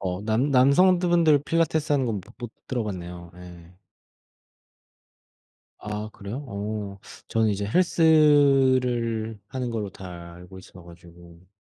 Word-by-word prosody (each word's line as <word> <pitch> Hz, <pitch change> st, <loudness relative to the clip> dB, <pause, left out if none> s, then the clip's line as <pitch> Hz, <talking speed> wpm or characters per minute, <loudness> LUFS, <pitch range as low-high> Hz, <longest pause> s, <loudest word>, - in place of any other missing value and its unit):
어 90 Hz, 0 st, -3 dB
남 115 Hz, +6 st, 0 dB
남성들 175 Hz, +8 st, +4 dB
분들 160 Hz, -5 st, +3 dB
필라테스하는 155 Hz, -5 st, 0 dB
건 105 Hz, -4 st, -2 dB
못 110 Hz, +5 st, -18 dB
못 120 Hz, -2 st, -7 dB, 0.2 s
들어 125 Hz, -3 st, -2 dB
봤네요 90 Hz, -3 st, -7 dB
예. 90 Hz, -1 st, -14 dB, 2.1 s
아 105 Hz, 0 st, -6 dB
그래요? 100 Hz, +5 st, -8 dB
오. 105 Hz, -5 st, -6 dB, 0.3 s
저는 110 Hz, -1 st, +1 dB
이제 100 Hz, 0 st, -2 dB
헬스를 130 Hz, -, +2 dB
하는 130 Hz, -2 st, -4 dB
걸로 110 Hz, -4 st, -4 dB
다 85 Hz, -2 st, -11 dB
알고 90 Hz, +2 st, -13 dB
있어 90 Hz, -1 st, -15 dB
가지고. 85 Hz, 0 st, -16 dB
110 Hz, 240 characters per minute, -24 LUFS, 95-140 Hz, 2.1 s, 남성들